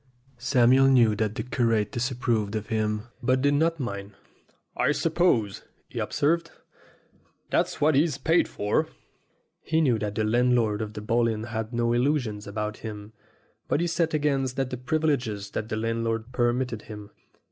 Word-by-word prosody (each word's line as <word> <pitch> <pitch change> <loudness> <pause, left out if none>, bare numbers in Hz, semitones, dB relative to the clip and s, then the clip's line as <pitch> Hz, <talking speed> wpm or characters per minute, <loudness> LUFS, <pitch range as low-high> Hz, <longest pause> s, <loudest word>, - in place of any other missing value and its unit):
Samuel 125 +1 +4
knew 120 -5 +5
that 110 -1 -1
the - - -3
curate 115 -5 0
disapproved 120 -4 -1
of 110 0 -4
him, 105 -1 -1 0.2
but 130 +2 +2
did 145 0 +3
not 165 +3 +1
mind. 100 -5 -5 0.6
"I - - +2
suppose," 155 - +1 0.3
he - - -5
observed, 165 +3 0 1.0
"that's - - 0
what 155 +2 +4
he's 145 +1 +2
paid 160 +5 +2
for." 105 0 0 0.7
He 160 0 0
knew 130 -8 +2
that 105 -1 -3
the 110 - 0
landlord 115 -1 +2
of 105 -1 -5
the 105 - -6
Bull 115 +2 +2
Inn 110 -1 -2
had 110 -1 -4
no 120 -1 +1
illusions 120 -5 0
about 105 +1 -4
him, 105 -1 -8 0.5
but - - +1
he 170 - +1
set 165 -1 0
against 135 -4 0
that 135 -1 -2
the 125 - -3
privileges 125 -7 -1
that 110 - -4
the 110 - -2
landlord 115 +1 -2
permitted 120 -2 0
him. 105 -1 -10
120 Hz, 160 wpm, -26 LUFS, 110-135 Hz, 1.0 s, knew